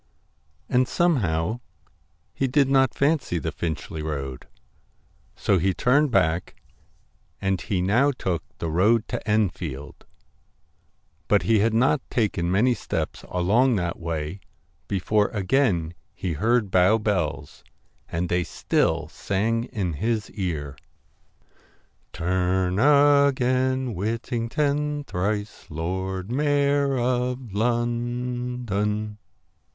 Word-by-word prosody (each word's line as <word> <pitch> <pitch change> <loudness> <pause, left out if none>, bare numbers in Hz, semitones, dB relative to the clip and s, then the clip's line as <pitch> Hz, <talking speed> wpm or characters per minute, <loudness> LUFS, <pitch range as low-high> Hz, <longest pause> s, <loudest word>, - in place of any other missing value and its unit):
And 125 0 +2
somehow, 110 - +1 0.7
he 135 - 0
did 140 +1 +3
not 135 -2 +3
fancy 140 - +1
the 80 - -3
Finchley 80 -1 -4
road, 70 -4 -5 0.9
so 95 - +2
he 95 +2 +1
turned 145 +4 +3
back 90 -6 +1 0.8
and 95 -1 0
he 90 -3 -1
now 120 +10 +3
took 95 - -2 0.2
the 80 - -3
road 105 +7 +3
to - - -3
Enfield. 85 -9 -2 1.2
But 105 - +3
he 110 -1 +3
had 110 +2 +2
not 130 +4 +3
taken 100 -7 0
many 110 +7 +3
steps 115 - -4
along 110 +8 +3
that 85 -3 -2
way 80 +1 -4 0.5
before 105 +2 +1
again 95 - +1 0.2
he 90 -3 -3
heard 110 +4 +1
Bow 95 +4 +5
bells, 80 -11 -2 0.5
and 85 +2 -2
they 90 +1 +1
still 80 -1 0
sang 110 +7 -1
in 95 -9 -3
his 110 +6 -2
ear 80 -9 -4 1.3
'Turn 90 +2 0
again, 130 -2 +3
Whittington, 140 - -1
Thrice 105 -1 -3
Lord 95 +5 -3
Mayor 140 0 +2
of 125 -2 -1
London.' 120 -2 -1
105 Hz, 105 wpm, -24 LUFS, 90-125 Hz, 1.3 s, Bow